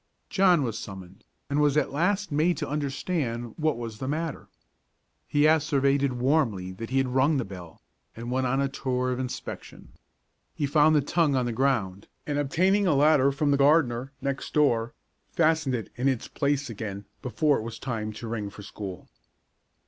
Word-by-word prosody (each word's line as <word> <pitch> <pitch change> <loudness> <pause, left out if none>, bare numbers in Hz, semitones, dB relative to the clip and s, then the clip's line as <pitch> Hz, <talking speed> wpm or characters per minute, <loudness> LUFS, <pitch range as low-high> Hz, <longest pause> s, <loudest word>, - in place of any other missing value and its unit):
John 180 -6 +4
was 115 -3 -3
summoned, 95 -2 -10 0.2
and 140 +1 0
was 150 -1 +3
at - - +1
last 190 +6 0
made 160 +4 +2
to 150 - -3
understand 135 -4 -2
what 155 -5 0
was 115 -2 -6
the 130 - -4
matter. 155 +2 -3 0.8
He 145 0 +2
asseverated 140 -3 +3
warmly 120 -8 +1
that 115 +5 -7
he 130 - 0
had 135 -1 +2
rung 135 +4 +2
the 130 - -1
bell, 90 -4 -11 0.3
and 120 +2 -6
went 130 0 +1
on 135 +2 +1
a 140 - +2
tour 130 -2 -2
of 125 - -2
inspection. 130 -1 -7 0.7
He 145 - -1
found 150 +2 +4
the 150 - +4
tongue 150 0 +1
on 130 -1 +1
the 120 - -2
ground, 110 -7 0 0.2
and 145 -1 -1
obtaining 185 +8 +2
a 155 - +3
ladder 140 -1 +4
from 145 +1 0
the 140 - +3
gardener, 135 -3 +3
next 140 0 -4
door, 120 -6 +2 0.3
fastened 155 -5 +2
it 115 - -5
in 125 +3 0
its 130 -4 0
place 145 -1 -1
again 100 -3 -6 0.2
before 145 +3 +1
it - - -5
was 115 0 -6
time 110 -4 -4
to 115 +2 -7
ring 110 -3 -3
for 105 +1 -11
school. 95 -3 -8
135 Hz, 180 wpm, -27 LUFS, 115-150 Hz, 0.8 s, John